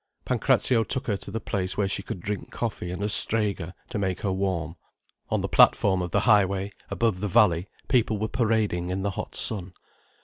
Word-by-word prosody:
Pancrazio 115 -3 +2
took 130 +3 -3
her 105 -3 0
to - - -10
the 110 +3 -3
place 95 -3 -3
where 100 -1 +1
she 95 - -2
could 95 - -7
drink 100 +1 -4
coffee 110 -6 -4
and 90 +3 -4
a - - +1
strega, 100 -4 +1
to 105 - -3
make 95 -2 -2
her 100 - -1
warm. 95 -4 -2 0.5
On - - 0
the - - -1
platform 95 -2 +4
of 90 - -3
the - - +1
high 105 -4 +5
way, 100 +1 -3 0.2
above 115 -6 0
the 105 - -2
valley, 95 -4 +3 0.2
people 115 -4 +2
were 110 +2 -1
parading 110 -7 0
in 95 +1 -2
the 100 - 0
hot - - -6
sun. 95 -4 0
100 Hz, 205 wpm, -26 LUFS, 90-110 Hz, 0.5 s, high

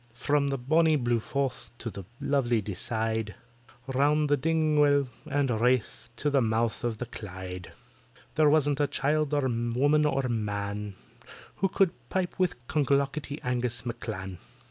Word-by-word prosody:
From 145 +3 +1
the 140 0 -1
bonnie 155 +5 +3
blue 120 -4 +1
Forth 130 0 -3
to 115 - -5
the 100 -2 -8
lovely 125 -5 +1
Deeside, 110 +2 -2 0.5
Round 145 +3 +2
by 145 - +4
Dingwall 150 -2 +3 0.2
and 140 -2 +1
Wrath 125 -1 +1
to 145 +5 -1
the 140 -1 +4
mouth 115 0 0
of 120 -2 -1
the 125 - -4
Clyde, 95 -5 -7 0.6
There 155 -1 +4
wasn't 145 -2 +3
a 145 - +3
child 150 +1 0
or 145 -2 +1
a 120 -1 -1
woman 145 +4 +3
or 135 -2 0
man 105 -3 -3 0.6
Who 195 - +2
could 190 -2 +3 0.2
pipe 185 -1 -2
with 185 -2 +2
CLONGLOCKETTY 140 +1 0
ANGUS 125 -2 -2
M'CLAN. 95 -6 -5
130 Hz, 145 wpm, -28 LUFS, 115-145 Hz, 0.6 s, by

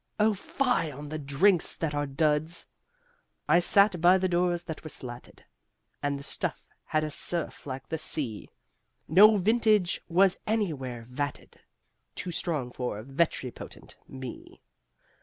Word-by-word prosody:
O 215 +1 +4
fie 225 - 0
on 145 +1 -8
the 155 +1 -4
drinks 160 +6 +2
that 160 -3 -2
are 145 0 -1
duds! 150 +3 0 0.8
I 170 - +5
sat 195 0 +4
by 180 +2 +6
the 185 0 +1
doors 175 -1 +1
that 160 -3 -7
were 155 - -7
slatted 120 -4 -8 0.6
And 145 0 -1
the 140 - -9
stuff - - -4 0.2
had 155 0 0
a 155 - -3
surf 170 0 -2
like 135 0 -6
the 160 - -2
sea 125 -10 -2 0.6
No 210 +6 +7
vintage 215 -2 +2
was 185 +2 +3
anywhere 145 - -2
vatted 140 +4 -5 0.6
Too 180 - -4
strong 150 -7 -2
for 120 -4 -4
ventripotent 135 -1 -3
me! 130 -2 -9
160 Hz, 140 wpm, -28 LUFS, 140-180 Hz, 0.8 s, No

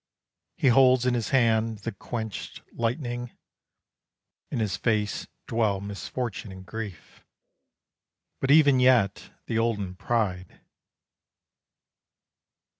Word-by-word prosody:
He 130 - +3
holds 130 0 +5
in 125 - +2
his 120 -3 -1
hand 115 -3 +2
the - - -1
quenched 110 +2 -6
lightning, 120 0 -3 1.1
In - - -3
his 105 -4 0
face 105 -2 -1 0.2
dwell 110 -4 +1
misfortune 100 +2 -5
and 95 0 -10
grief; 105 -6 -8 1.2
But 135 - -2
even 140 -3 +6
yet 125 -6 +3 0.2
the 115 - -1
olden 105 -5 -1
pride. 95 -3 -2
115 Hz, 100 wpm, -26 LUFS, 100-125 Hz, 1.2 s, even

